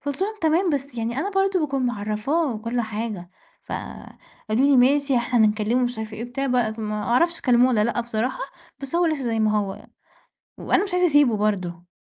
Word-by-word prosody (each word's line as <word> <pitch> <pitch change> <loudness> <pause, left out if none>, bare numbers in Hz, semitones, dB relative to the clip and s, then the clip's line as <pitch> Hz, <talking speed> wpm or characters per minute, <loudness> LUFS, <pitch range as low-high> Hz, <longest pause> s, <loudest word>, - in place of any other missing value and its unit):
فقُلت 285 +3 -5
لهم 420 +3 -1
"تمام 330 +3 +2
بس 280 -2 -3
يعني 235 +3 -2
أنا 395 +7 -1
برضه 390 -2 +1
باكون 275 -4 -1
معرّفاه 230 +6 -1
كُل 235 +2 -2
حاجة،" 215 -5 -5 0.3
فقالوا 225 +4 -5
لي: 280 - +5
"ماشي 275 +1 +3
إحنا 240 +1 +1
هنكلّمه" 215 +4 +1
مش 245 -2 -3
عارفة 220 0 -6
إيه 230 - -5
وبتاع 270 +3 -3
بقت 235 -3 0
ما 210 -1 -3
أعرفش 335 +10 +1
كلّموه 250 0 +4
والّا 215 -4 +2
لأ 235 +1 0
بصراحة 240 - -2 0.4
بس 275 +3 -7
هو 345 0 +3
لسه 310 -4 -1
زي 225 -2 0
ما 215 -1 +2
هو، 195 -2 -5 0.7
وأنا - - +1
مش 390 -3 -5
عايزة 360 0 +3
أسيبه 290 -8 +4
برضه. 180 -5 -2
245 Hz, 190 wpm, -23 LUFS, 215-285 Hz, 0.7 s, لي